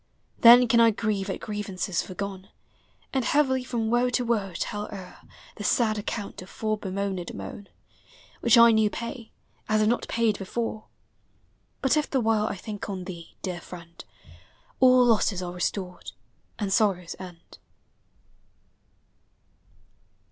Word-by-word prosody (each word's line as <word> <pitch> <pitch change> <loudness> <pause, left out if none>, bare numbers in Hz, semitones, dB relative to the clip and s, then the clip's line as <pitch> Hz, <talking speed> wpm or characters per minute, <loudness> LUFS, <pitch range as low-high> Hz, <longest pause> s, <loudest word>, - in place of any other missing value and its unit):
Then 240 +1 +9
can 235 +1 +4
I 230 0 +7
grieve 210 -2 -2
at 190 - -3
grievances 195 -4 -3
foregone, 195 0 -6 0.6
And 265 -2 +1
heavily 260 -1 +2
from 230 -3 -2
woe 245 +1 +3
to 245 0 0
woe 215 -5 0
tell 205 0 -3
o'er 190 -3 -10 0.4
The 210 - -6
sad 215 0 +2
account 205 -1 -5
of 185 - -11
fore 215 -1 -2
bemoaned 190 -2 -3
moan, 100 - -8 0.7
Which - - +5
I 235 0 +8
new 220 -1 +3
pay, 235 +1 -7 0.4
as 215 0 +3
if 215 - +3
not 240 +2 0
paid 225 -3 +1
before; 220 +2 -4 1.0
But 265 +3 +3
if 300 - 0
the 270 - +1
while 220 -2 +1
I - - -3
think 205 +2 -7
on 190 -2 -4
thee, 170 -3 -9
dear 180 -2 -4
friend, 170 -1 -11 0.8
All 255 -1 +6
losses 210 -5 +2
are 175 0 -5
restored, 180 +1 -4 0.4
and 200 -3 -1
sorrows 190 -5 +1
end. 180 -3 -12
210 Hz, 140 wpm, -26 LUFS, 190-235 Hz, 1.0 s, Then